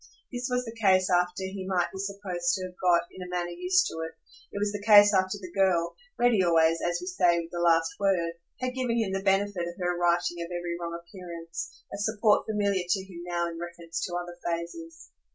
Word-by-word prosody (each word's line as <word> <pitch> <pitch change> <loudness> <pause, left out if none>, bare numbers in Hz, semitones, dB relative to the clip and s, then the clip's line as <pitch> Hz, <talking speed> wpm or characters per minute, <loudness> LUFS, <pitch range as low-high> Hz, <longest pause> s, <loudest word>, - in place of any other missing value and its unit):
This 245 0 -2
was 250 0 0
the 225 0 -8
case 185 -2 +4
after 180 +1 +1
he 190 0 -5
might 180 -2 +1
be 190 - -7
supposed 195 -3 -1
to 185 -1 -4
have 185 - -8
got, 175 -2 +4
in 185 - -11
a 180 - -7
manner, 175 -1 -2
used 365 - +2
to 160 - -5
it; 160 0 -4 0.4
it - - -6
was 205 0 0
the 205 0 -5
case 205 -1 +8
after 190 +1 +2
the 185 -3 -9
girl 175 -3 +2 0.2
ready 240 -5 +4
always, 165 -1 +3
as 175 0 0
we 180 - -7
say, 180 -2 +2
with 165 0 -6
the 175 - -4
last 165 -1 +3
word 185 -4 +1 0.3
had 255 0 -1
given 250 -2 -1
him 220 -4 0
the 195 0 -1
benefit 195 -2 +1
of 175 - -7
her 180 -1 0
righting 175 0 +1
of 170 - -5
every 175 -1 -3
wrong 170 0 -4
appearance, 170 -1 -8
a 200 - -5
support 215 0 +2
familiar 200 -3 +1
to 190 +1 +1
him 185 -3 -10
now 170 -1 0
in 165 -1 -6
reference 170 -1 -5
to 175 - -3
other 175 0 -5
phases. 320 - -5
180 Hz, 225 wpm, -28 LUFS, 170-200 Hz, 0.4 s, case